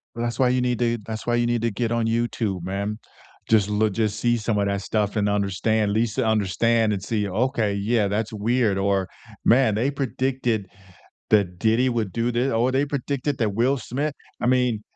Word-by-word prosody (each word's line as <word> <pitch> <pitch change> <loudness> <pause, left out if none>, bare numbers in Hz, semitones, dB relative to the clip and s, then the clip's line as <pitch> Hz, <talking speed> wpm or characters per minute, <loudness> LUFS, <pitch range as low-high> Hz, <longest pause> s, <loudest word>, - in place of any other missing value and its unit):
Well, 120 0 -3
that's 120 0 -3
why 130 -2 +3
you 125 0 +2
need 125 -1 0
to 120 -1 +1
that's 110 -1 -6
why 120 0 +2
you 120 0 +1
need 120 -1 0
to 115 - +1
get 115 +2 -2
on 115 -1 0
YouTube, 115 -5 -1
man. 100 +4 -3 0.5
Just 105 -3 +3
loo 105 +1 +1
just 105 0 -1
see 120 0 +2
some 110 -1 -1
of 100 - +1
that 100 0 -1
stuff, 105 +1 -1
and 105 -1 +1
understand 105 +1 0
least 110 +1 0
to 130 -3 +1
understand 110 +1 +2
and 100 -2 -3
see, 105 -1 -1
"Okay, 110 +1 0
yeah, 105 +1 +1
that's 105 +2 -2
weird," 110 -1 +1
or, 95 -1 +1 0.4
"Man, 120 -2 +4
they 120 +6 +1
predicted 130 -5 -1 0.6
that 95 -5 +2
Diddy 115 +5 +2
would 115 -6 -1
do 115 +1 0
thi" 120 +3 0
"Oh, 115 +3 +2
they 135 +2 +2
predicted 140 0 -2
that 105 -4 0
Will 130 +5 +2
Smith" 140 +5 -3 0.3
I - - -1
mean 125 -4 +2
115 Hz, 205 wpm, -23 LUFS, 105-120 Hz, 0.6 s, Man